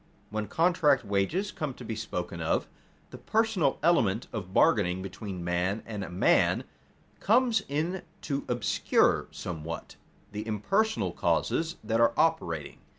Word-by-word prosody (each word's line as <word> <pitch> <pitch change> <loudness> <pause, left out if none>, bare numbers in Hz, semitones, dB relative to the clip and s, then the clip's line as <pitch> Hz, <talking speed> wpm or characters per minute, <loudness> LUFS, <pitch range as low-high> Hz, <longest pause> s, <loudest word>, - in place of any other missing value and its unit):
_ - - -32 0.3
When 105 0 -2
contract 160 - +3
wages 105 - 0
come 150 -6 -4
to 125 - -10
be 110 - -3
spoken 90 -5 -4
of, 80 - 0 0.4
the - - -9
personal 220 -10 +1
element 115 - +3
of 95 -5 -5
bargaining 95 - +3
between 95 -1 -6
man 90 +4 -1
and 105 -5 -5
man 90 - +3 0.6
comes 230 0 +3
in 160 +6 -1 0.2
to 140 -1 -2
obscure 120 -3 +2
somewhat 85 -1 -6 0.3
the 105 +1 -5
impersonal 195 - 0
causes 165 +1 0
that 115 +1 +1
are 115 - +4
operating. 150 - 0
115 Hz, 135 wpm, -29 LUFS, -, 0.6 s, are